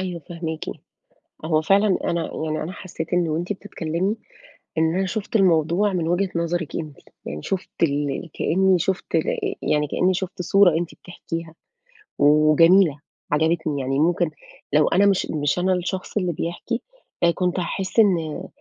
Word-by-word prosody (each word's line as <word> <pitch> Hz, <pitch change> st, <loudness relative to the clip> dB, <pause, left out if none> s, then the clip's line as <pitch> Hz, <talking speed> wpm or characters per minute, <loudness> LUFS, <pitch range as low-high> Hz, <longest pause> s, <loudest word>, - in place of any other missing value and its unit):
أيوه، 180 Hz, -3 st, -4 dB
فاهماكِ. 165 Hz, -2 st, -5 dB, 0.8 s
هو 160 Hz, -1 st, +2 dB
فعلًا 195 Hz, +2 st, +3 dB
أنا 170 Hz, -1 st, -1 dB
يعني 155 Hz, 0 st, -2 dB
أنا 170 Hz, +4 st, -5 dB
حسيت 175 Hz, -3 st, -7 dB
إن 175 Hz, -2 st, +2 dB
وأنتِ 170 Hz, +5 st, -1 dB
بتتكلمي، 190 Hz, 0 st, -3 dB, 0.6 s
إن 160 Hz, +1 st, +2 dB
أنا 190 Hz, 0 st, +1 dB
شُفت 215 Hz, +3 st, -2 dB
الموضوع 180 Hz, +2 st, +3 dB
من 170 Hz, -3 st, -1 dB
وجهة 185 Hz, +2 st, +1 dB
نظرِك 170 Hz, -1 st, -2 dB
أنتِ، 155 Hz, -4 st, -5 dB, 0.3 s
يعني 75 Hz, +2 st, -5 dB
شُفت 190 Hz, -1 st, -3 dB
ال 145 Hz, +2 st, 0 dB
كأني 190 Hz, +1 st, +2 dB
شُفت 190 Hz, +3 st, -2 dB
ال -, -, +2 dB
ي 420 Hz, -5 st, -2 dB
يعني 150 Hz, 0 st, +1 dB
كأني 185 Hz, +5 st, +1 dB
شُفت 185 Hz, 0 st, -4 dB
صورة 185 Hz, -1 st, +5 dB
أنتِ 170 Hz, -1 st, -4 dB
بتحكيها، 165 Hz, -2 st, -7 dB, 0.7 s
وجميلة، 155 Hz, +2 st, +5 dB, 0.3 s
عجبتني 155 Hz, -2 st, +1 dB
يعني، 135 Hz, +2 st, -1 dB
ممكن 170 Hz, +1 st, +2 dB, 0.4 s
لو 150 Hz, 0 st, +5 dB
أنا 200 Hz, +3 st, +4 dB
مش 195 Hz, -2 st, +2 dB
مش 145 Hz, +2 st, 0 dB
أنا 185 Hz, +1 st, +2 dB
الشخص 185 Hz, +3 st, -3 dB
اللي 180 Hz, -4 st, 0 dB
بيحكي، 175 Hz, +10 st, -3 dB, 0.4 s
أ 170 Hz, -, +6 dB
كنت 180 Hz, +1 st, -1 dB
هاحس 190 Hz, +5 st, -2 dB
إن 170 Hz, -7 st, +2 dB
170 Hz, 155 wpm, -23 LUFS, 160-190 Hz, 0.8 s, أ